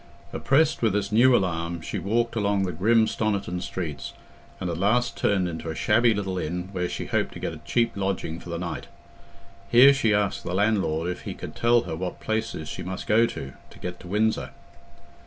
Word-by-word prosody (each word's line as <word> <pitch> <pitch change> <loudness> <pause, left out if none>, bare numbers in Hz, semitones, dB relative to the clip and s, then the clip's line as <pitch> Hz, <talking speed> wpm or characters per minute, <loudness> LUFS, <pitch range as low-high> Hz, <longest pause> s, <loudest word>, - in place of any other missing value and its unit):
Oppressed 155 +3 +2
with 110 -4 +2
this 100 0 -1
new 120 +4 +6
alarm, 85 -4 -1
she - - -4
walked 115 +3 0
along 100 -2 +1
the 90 - -1
grim 110 +7 +3
Stoniton 100 -5 -1
streets, 85 -6 -5 0.5
and 95 - -3
at 85 -1 -3
last 120 +6 +2
turned 95 -3 +1
into 80 -1 -5
a 80 - -4
shabby 115 +6 +3
little 95 -3 -2
inn, 90 +3 -3
where 90 -2 -2
she - - -4
hoped - - -1
to - - -8
get - - -3
a - - -9
cheap 115 -1 +1
lodging 95 -4 -2
for - - -11
the 85 - -3
night. 85 0 -5 0.8
Here 130 +4 +8
she 125 -6 +1
asked 105 -1 +1
the 90 - -3
landlord 95 -6 +1
if 90 - -4
he - - -6
could - - -8
tell 120 0 +4
her 80 - -5
what 90 +2 -5
places 110 -8 -3
she 70 - -6
must 95 +1 -5
go 115 +2 +4
to, 70 -9 -7 0.2
to - - -15
get 90 0 -6
to 90 - -11
Windsor. 110 +4 0
100 Hz, 205 wpm, -25 LUFS, 90-110 Hz, 0.8 s, Here